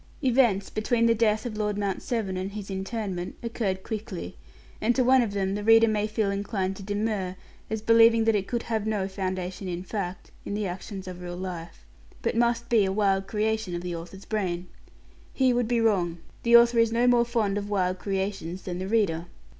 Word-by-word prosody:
Events, 235 -7 +3
between 230 +2 +1
the 230 - +5
death 220 0 +1
of 230 -3 -4
Lord 210 -1 -1
Mount 200 -2 -1
Severn 220 -6 -2
and 190 +2 -4
his 205 -2 -6
interment, 190 -2 -4
occurred 205 -5 -2
quickly; 200 - -5 0.5
and 235 +2 +2
to 255 - +3
one 260 +1 +5
of 220 -4 -1
them 195 -1 0
the 205 +1 -3
reader 225 +1 +6
may 210 -1 +1
feel 215 -2 0
inclined 200 -1 -2
to - - -9
demur, 205 -2 -2 0.3
as 220 0 -3
believing 230 0 +6
that 225 0 +3
it 200 -2 0
could 235 -1 -2
have 220 -2 -2
no 205 -3 0
foundation 190 -1 -4
in 180 0 -4
fact, 190 -2 -5
in 200 - -4
the 210 0 -1
actions 190 +1 -6
of 180 -1 -7
real 175 0 -6
life, 175 -3 -7 0.4
but - - 0
must 235 0 +1
be 230 -4 +4
a 190 - 0
wild 195 -1 +1
creation 220 -3 -1
of 175 - -4
the 175 -1 -3
author's 175 +4 -9
brain. 185 -5 -2 0.7
He 260 -2 +3
would 240 -1 +1
be 240 0 +1
wrong. 185 -7 +2 0.2
The 235 0 +7
author 235 0 +5
is 230 -1 +4
no 235 +2 +2
more 245 -1 +5
fond 220 -4 0
of 205 0 -6
wild 185 -2 0
creations 190 -3 -3
than 180 -1 -4
the 185 - -3
reader. 185 -6 +1
205 Hz, 205 wpm, -27 LUFS, 190-225 Hz, 0.7 s, The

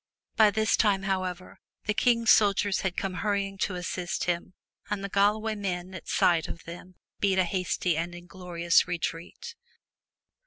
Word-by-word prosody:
By 220 -1 +6
this 220 +2 +2
time, 200 -3 +2
however, 185 -2 -3 0.3
the 210 - +1
King's 230 0 +3
soldiers 200 -1 +3
had 190 -2 -2
come 195 -1 -2
hurry 200 -1 +1
ing 195 0 -9
to 185 - -1
assist 180 0 -3
him, 175 +1 -2 0.3
and 205 -1 -2
the 200 - -3
Galloway 210 +3 +2
men 185 -3 -4
at 185 - -9
sight 170 -3 +2
of - - -8
them 175 +2 -10 0.2
beat 195 -2 +2
a 185 - +5
hasty 180 -1 -1
and 170 +2 -3
inglorious 175 -1 0
retreat. 175 - -5
190 Hz, 160 wpm, -27 LUFS, 175-205 Hz, 0.3 s, By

